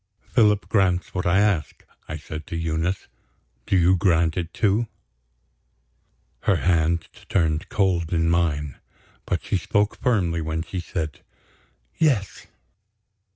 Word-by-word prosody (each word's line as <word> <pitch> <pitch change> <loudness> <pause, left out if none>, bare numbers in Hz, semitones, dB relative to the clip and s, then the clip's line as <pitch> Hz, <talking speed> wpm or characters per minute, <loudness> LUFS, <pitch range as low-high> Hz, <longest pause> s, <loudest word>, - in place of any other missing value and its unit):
"Philip 105 -4 +3
grants 95 -4 +1
what 90 -1 -1
I 85 +2 +4
ask," 100 -7 0 0.2
I 75 - -5
said 80 0 -8
to - - -5
Eunice. 85 +3 -1 0.6
"Do 95 - +3
you 90 +1 +5
grant 85 -3 +2
it, 85 -2 -3
too?" 105 +3 +1 1.5
Her - - +2
hand 85 -1 +1 0.2
turned 80 -3 +1
cold 90 -5 +1
in 85 -1 +2
mine; 75 -5 0 0.5
but - - -1
she - - 0
spoke 105 +4 0
firmly 90 -9 +1
when 80 +1 -2
she 90 +2 -5
said: 80 -4 -4 0.8
"Yes." 130 - +1
85 Hz, 125 wpm, -24 LUFS, 80-95 Hz, 1.5 s, you